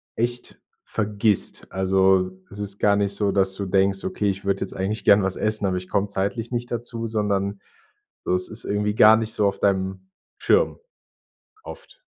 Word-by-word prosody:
echt 120 +1 -3 0.2
vergisst, 105 -1 -1
also, 95 0 +2 0.2
es 100 - -10
ist 100 -1 -5
gar 100 -1 +4
nicht 100 -1 0
so, 100 -1 +1
dass 95 -1 +1
du 100 +1 -4
denkst: 95 +1 +1
„Okay, 105 - -1
ich 100 0 -4
würde 100 0 0
jetzt - - -4
eigentlich 100 +3 -2
gerne 100 0 +5
was 95 0 -1
essen, 110 -1 -1
aber 90 -1 0
ich 90 0 -7
komme 100 +1 +1
zeitlich 100 +4 -3
nicht 120 0 -3
dazu", 115 -1 -3
sondern 100 -2 -1 0.6
so - - +1
es 90 - -1
ist 110 +1 -6
irgendwie 105 0 -1
gar 110 +1 +7
nicht 110 0 -3
so 105 -3 +2
auf 100 - -2
deinem 95 -1 -1 0.3
Schirm - - +2 0.9
oft. - - -12
100 Hz, 185 wpm, -23 LUFS, 95-110 Hz, 0.9 s, gar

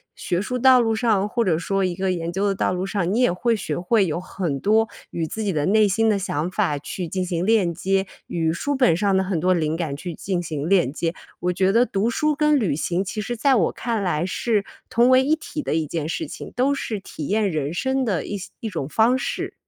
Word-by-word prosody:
学 175 +1 -2
术 250 +5 -3
道 260 0 +7
路 225 -1 +1
上， 215 -3 +1
或 235 +1 +1
者 175 -6 +2
说 195 +3 -1
一 180 -1 -2
个 190 +1 0
研 170 -1 -3
究 195 +3 0
的 195 - 0
道 185 - 0
路 180 +1 -2
上， 195 -3 -1
你 230 - +1
也 245 - +4
会 230 +6 +1
学 155 -8 -3
会 195 +3 +2
有 165 0 -2
很 175 -6 -3
多 220 +5 +3 0.2
与 165 - -2
自 220 +5 -4
己 200 - 0
的 150 -1 0
内 215 +1 +4
心 220 +3 +2
的 205 - +2
想 170 -3 -2
法 185 -7 0
去 170 +5 -5
进 185 +3 -2
行 175 0 -2
链 205 -6 +3
接， 190 +3 0 0.2
与 165 -2 0
书 285 +11 -2
本 250 -10 +4
上 195 +2 +1
的 190 - +2
很 185 -3 -1
多 185 +3 +3
灵 160 -2 0
感 165 -4 -3
去 175 +1 -6
进 180 +2 -2
行 155 -2 -4
链 180 -9 +3
接。 165 +1 -2 0.3
我 180 +1 0
觉 190 +1 +2
得 235 +4 +4
读 205 +2 0
书 300 +5 +1
跟 300 -1 +3
旅 195 - 0
行 175 +4 -1
其 205 +2 -4
实 240 +4 -3
在 265 +3 +3
我 180 -8 +2
看 230 -2 -2
来 170 -2 0
是 210 +3 0 0.3
同 240 +2 +4
为 260 0 +6
一 305 +3 +3
体 310 -1 -6
的 - - -2
一 160 -1 0
件 155 -1 -3
事 320 - -3
情， - - -8
都 265 +3 +2
是 220 -6 -3
体 155 -6 -7
验 210 -1 +1
人 155 -1 -2
生 265 +6 0
的 195 -7 -1
一 205 - -4
些 190 - -8
一 225 - -4
种 140 -9 -4
方 230 +8 +3
式。 - - -3
195 Hz, 270 characters per minute, -23 LUFS, 170-225 Hz, 0.3 s, 道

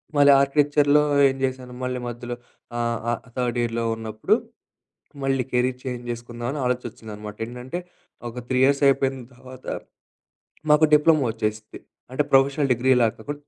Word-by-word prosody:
మళ్ళీ 145 0 +7
ఆర్కిటెక్చర్‌లో 145 +1 +3 0.2
ఏం 135 - -1
జేసాను, 130 -1 -3
మళ్ళీ 125 0 -2
మధ్యలో 120 0 -5 0.4
ఆహ్, 115 -1 -1
ఆహ్, 120 - -3 0.2
తర్డ్ 125 -1 -1
ఇయర్‌లో 115 0 -1
ఉన్నప్పుడు 110 -1 0 0.9
మళ్ళీ 135 -1 +1
కెరీర్ 125 +1 0
చేంజ్ 125 -2 -5
చేసుకుందాం 120 0 -6
అని 150 - -4
ఆలోచన 125 -1 -1
వచ్చిందనమాట 105 -1 -9
ఏంటంటే, 125 +7 -6 0.5
ఒక 120 +2 -7
3 130 0 +1
ఇయర్స్ 140 +1 +2
అయిపోయిన 135 -1 +2 0.2
తర్వాత, 130 0 -13 1.1
మాకు 150 +1 +6
డిప్లొమా 150 -2 +4
ఒచ్చేసిద్ది 110 -1 -4 0.3
అంటే 150 - +2
ప్రొఫెషనల్ 135 +1 +4
డిగ్రీలా 125 0 +3
కు 145 - -6
125 Hz, 140 wpm, -24 LUFS, 120-135 Hz, 1.1 s, మళ్ళీ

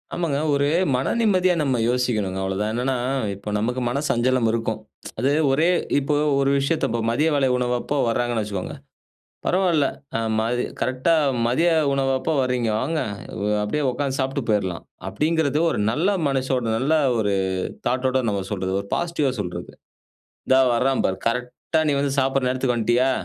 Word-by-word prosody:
ஆமாங்க. 165 -5 -1 0.2
ஒரு 140 0 +2 0.3
மன 130 +1 0
நிம்மதியா 185 -5 +3
நம்ம 135 -4 +1
யோசிக்கணும்ங்க 110 -6 0
அவ்வளோதான். 95 +2 -1
என்னன்னா, 125 +3 0 0.4
இப்ப 100 +2 -7
நமக்கு 125 +4 -1
மன 130 +4 -1
சஞ்சலம் 125 0 +2
இருக்கும். 115 -1 -1 0.4
அது 135 - +2 0.2
ஒரே 155 +5 +3 0.3
இப்ப 140 +1 -3 0.3
ஒரு 135 0 +2
விஷயத்த 140 +4 0
இப்ப 115 +1 -1
மதிய 145 +8 +2
வேலை 135 -2 +2
உணவப்போ 125 +2 -1
வராங்கன்னு 120 -1 0
வச்சுக்கோங்க, 100 -3 -5 0.7
பரவால்ல 175 -6 +2 0.3
அ - - 0 0.2
மதி 120 +2 0 0.2
"கரெக்ட்டா 130 +6 +1 0.3
மதிய 160 +9 +2 0.2
உணவப்போ 135 +2 0
வர்றீங்க, 125 -2 0
வாங்க! 155 +4 -1 0.4
வ் 105 +1 +1
அப்படியே 150 +9 -1
உக்கார்ந்து 135 +1 -2
சாப்புட்டு 135 +1 -1
போயிரலாம்." 95 -5 -1 0.2
அப்படீங்கிறது 155 -2 0
ஒரு - - -2
நல்ல 155 +10 0 0.2
மனசோட, 130 -2 0
நல்ல 135 +6 0 0.3
ஒரு 100 -2 +1 0.5
தாட்டோட 130 +1 +1
நம்ம 100 -2 -1
சொல்றது. 95 -2 -2
ஒரு 100 - -10
பாசிட்டிவா 165 -6 0
சொல்றது. 90 -3 -5 0.8
"இந்தா 130 0 +5
வரான் 130 +3 +1
பாரு! 95 0 -2
கரெக்ட்டா 125 +6 -2
நீ - - +2
வந்து 140 -1 0
சாப்படுற 135 -1 +1
நேரத்துக்கு 125 -1 0
வண்ட்டியா? 120 +3 +2
130 Hz, 150 wpm, -23 LUFS, 115-140 Hz, 0.8 s, இந்தா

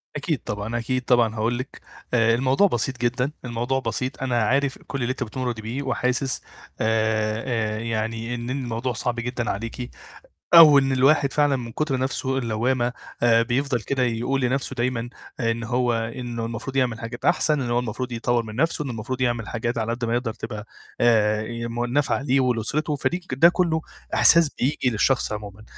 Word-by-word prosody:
أكيد 145 0 -1
طبعًا، 105 +3 -3
أكيد 130 +2 -1
طبعًا 120 -3 +3
هاقول 115 +2 0
لِك، 130 +2 -7 0.3
آآ، 115 -1 +4
الموضوع 130 +10 +3
بسيط 130 - -1
جدًا، 125 +3 0
الموضوع 120 +2 -1
بسيط. 130 0 -3
أنا 120 -4 +1
عارف 135 +4 +1
كل 140 - -4
اللي 120 +1 0
أنتِ 130 - -3
بتمُرّي 120 0 -4
بيه، 120 +6 -4
وحاسس، 130 -1 -1 0.4
آآ، 110 0 0
يعني 115 +1 -2
إن 120 +1 -5
إن 135 +2 -2
الموضوع 120 +1 -2
صعب 120 +1 -2
جدًا 120 0 -3
عليكِ، 115 +4 -4 0.7
أو 155 -4 +10
إن 135 0 +2
الواحد 135 +2 +3
فعلًا 145 -2 +3
من 120 -2 -6
كتر 150 +1 -1
نفسه 130 0 -1
اللوامة، 120 +1 0 0.3
آآ، 115 -1 +5
بيفضَل 125 +1 0
كده 130 +5 -1
يقول 125 +3 0
لنفسه 130 +1 -1
دايمًا 120 -1 -1 0.3
إن 115 -1 0
هو 120 +1 +1
إنه 115 +1 -3
المفروض 115 +4 -5
يعمل 125 -4 +1
حاجات 115 +2 -7
أحسن، 155 -2 +2
إنه 120 -2 -2
هو 120 - +2
المفروض 125 +1 -3
يطوّر 120 0 0
من 110 -1 -9
نفسه، 160 +3 +1
إنه 135 - -4
المفروض 120 +3 -5
يعمل 120 -3 0
حاجات 120 +1 -2
على 115 +1 -1
قد 120 +1 -3
ما 115 0 0
يقدر 120 -2 -1
تبقى 110 -2 -7 0.3
آآ، 110 -3 +3
يم 115 +1 -3
نافعة 135 +2 0
ليه 135 -1 +2
ولأسرته، 130 +5 0
فدي 175 +5 -1
ك 180 -7 -6
ده 160 +6 +7
كله 170 -3 +1 0.3
إحساس 165 -3 +6
بييجي 130 -1 +1
للشخص 120 +2 +1
عمومًا. 105 0 -7
120 Hz, 180 wpm, -24 LUFS, 115-135 Hz, 0.7 s, أو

